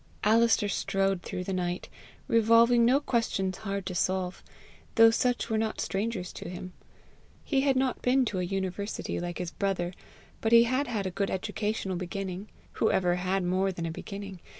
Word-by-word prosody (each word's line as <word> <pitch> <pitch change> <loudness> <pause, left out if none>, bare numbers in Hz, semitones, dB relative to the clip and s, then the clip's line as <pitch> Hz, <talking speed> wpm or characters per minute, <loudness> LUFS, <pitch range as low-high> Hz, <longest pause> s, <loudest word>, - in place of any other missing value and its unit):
Alister 225 0 +4
strode 195 -1 0
through 180 - -5
the 195 - -3
night, 180 -1 -2 0.4
revolving 230 +1 +5
no 255 +4 +5
questions 210 -8 -1
hard 200 -2 -4
to 185 - -3
solve, 185 +1 -1 0.5
though 225 -1 +8
such 245 +1 +1
were 220 -2 0
not 220 0 -2
strangers 195 -2 -2
to - - -7
him. 180 0 -7 0.7
He 275 -3 +1
had 270 -1 +2
not 260 -1 0
been 255 +1 +3
to 205 -5 -2
a - - 0
university 195 +2 -3
like 175 0 -4
his 175 -2 -4
brother, 185 -3 -1 0.5
but 225 - 0
he 230 0 +9
had 255 +4 0
had 215 -5 -2
a 185 - -2
good 195 +2 -1
educational 205 -1 -2
beginning 185 +2 -5 0.2
who 220 - +1
ever 180 -1 +2
had 185 +1 0
more 185 +2 +1
than 170 -2 -5
a 165 - -2
beginning? 195 +2 -7
195 Hz, 175 wpm, -28 LUFS, 185-230 Hz, 0.7 s, he